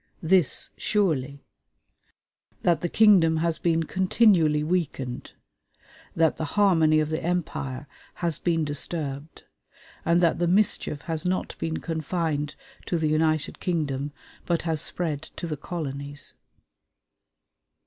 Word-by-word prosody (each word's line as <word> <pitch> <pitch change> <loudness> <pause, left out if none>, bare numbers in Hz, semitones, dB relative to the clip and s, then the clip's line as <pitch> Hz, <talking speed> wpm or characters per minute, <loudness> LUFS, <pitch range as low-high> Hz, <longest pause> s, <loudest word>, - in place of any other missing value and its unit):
This, 175 -2 +2
surely: 140 -10 0 1.2
that 170 -3 +2
the 175 - -1
kingdom 185 -7 +5
has 165 0 0
been 165 -1 +1
continually 180 -4 +3
weakened, 150 -7 -2 0.8
that 165 -1 +2
the - - -3
harmony 165 -6 +4
of 155 -1 0
the 155 0 -2
empire 150 -6 -2 0.3
has 170 -4 -2
been 165 -3 +1
disturbed, 145 0 -4 0.6
and 170 +1 +3
that 170 -2 +2
the 175 - +2
mischief 180 -6 +1
has 165 -3 -1
not 185 0 -1
been 160 -1 -2
confined 160 -2 -2 0.3
to 175 - 0
the 155 -1 0
United 155 -1 +1
Kingdom, 145 -5 -2 0.4
but 170 -1 +1
has 160 -3 0
spread 160 -4 -2
to 155 - -8
the 160 -2 -3
colonies.... 145 -2 -4
160 Hz, 120 wpm, -26 LUFS, 150-175 Hz, 1.2 s, kingdom